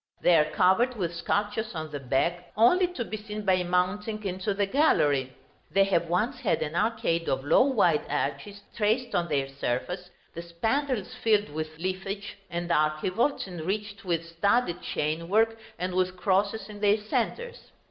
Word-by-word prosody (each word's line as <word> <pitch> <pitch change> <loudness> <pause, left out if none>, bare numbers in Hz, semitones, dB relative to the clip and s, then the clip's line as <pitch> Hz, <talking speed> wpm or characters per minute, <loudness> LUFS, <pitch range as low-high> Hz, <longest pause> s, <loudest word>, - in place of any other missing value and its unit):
They 175 - +6
are 155 -2 +5
covered 235 +8 +3
with 175 -5 -2
sculptures 205 +4 -2
on 155 -1 -5
the 145 - -4
back, 170 +7 -1
only 355 - +5
to 305 -10 -5
be 215 - -5
seen 210 0 -6
by 185 -2 +3
mounting 185 +5 -1
into 190 +1 -2
the 200 0 +1
gallery. 145 - +2 0.4
They 195 - +4
have 170 -4 +1
once 225 +9 0
had 200 -8 +1
an 155 +1 -5
arcade 170 -6 0
of 135 +1 -1
low 145 - +5
wide 190 - +2
arches 150 +9 -3
traced 230 +3 0
on 175 -1 +1
their 140 -3 0
surface, 140 +7 -3 0.2
the 170 - -6
spandrils 225 +7 -1
filled 210 -2 +2
with 155 +1 -5
leafage, 190 +3 -4
and 175 0 -3
archivolts 180 - +1
enriched 200 +4 -4
with 170 -3 -1
studded 175 +3 +1
chainwork 170 +9 0 0.2
and 180 0 -3
with 185 0 0
crosses 200 +3 +1
in 210 -1 -10
their 205 0 +4
centres. 475 - -3
185 Hz, 160 wpm, -27 LUFS, 170-215 Hz, 0.4 s, They